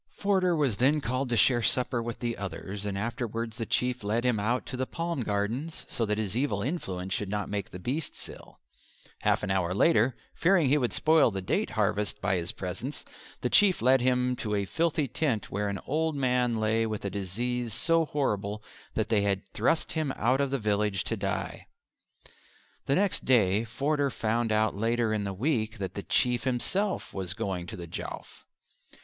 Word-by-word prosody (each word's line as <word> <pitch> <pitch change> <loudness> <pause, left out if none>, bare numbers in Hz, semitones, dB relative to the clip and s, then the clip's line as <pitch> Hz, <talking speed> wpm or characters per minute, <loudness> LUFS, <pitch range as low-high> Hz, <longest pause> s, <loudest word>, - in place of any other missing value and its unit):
Forder 190 -3 +2
was 140 -9 +1
then 140 +6 +3
called 130 0 -2
to 120 - +1
share 120 0 +4
supper 120 +1 +1
with 115 0 -4
the 120 -1 -1
others, 100 +1 -5
and 100 -1 -2
afterwards 115 0 -3
the 115 - -3
Chief 125 -2 0
led 110 +4 0
him 120 -4 +2
out 120 +5 0
to - - -5
the 130 0 -2
palm 170 -4 -3
gardens, 115 +9 -2
so 115 - -1
that 105 0 0
his 105 -2 -2
evil 120 -6 0
influence 95 - -3
should 105 - -2
not 105 0 -2
make 100 -1 -3
the - - -8
beasts 135 - -4
ill; - - -13 0.6
half - - +1
an 100 - -1
hour 90 -1 0
later, 120 0 +4 0.2
fearing 170 -5 +3
he 145 - +4
would 125 -3 0
spoil 160 -4 +4
the 95 -3 -4
date 90 - 0
harvest 105 -3 0
by - - 0
his 85 -1 +1
presence, 100 +10 -5 0.4
the - - 0
Chief 200 -3 +6
led 130 +2 +4
him 125 0 +2
to 105 -3 -2
a 100 -1 0
filthy 160 - 0
tent 125 -4 -1
where 100 +1 -1
an 100 - -2
old 160 +2 0
man 125 -4 +1
lay 110 +1 +1
with 110 -2 -4
a 100 - -2
disease 115 +5 -2
so 165 +9 +3
horrible 105 -7 -2 0.3
that 110 - 0
they 110 -3 +3
had 100 -1 0
thrust 130 +9 +1
him 155 -4 -1
out 125 +5 +2
of 140 - +1
the 140 - 0
village 105 -3 0
to 115 - -2
die. 100 -2 -3 1.2
The 140 - +3
next 200 0 +1
day 110 -4 +3
Forder 140 +5 0
found 115 -1 0
that 110 0 +2
later 115 +2 +1
in 105 -1 -1
the 100 - -2
week 115 0 -1
the 95 -3 -3
old 100 - -6
Chief 125 -1 +2
himself 190 - 0
was 95 0 -2
going 95 -6 -3
to - - -7
the 85 - -6
Jowf. 80 - -7
115 Hz, 195 wpm, -28 LUFS, 105-135 Hz, 1.2 s, Chief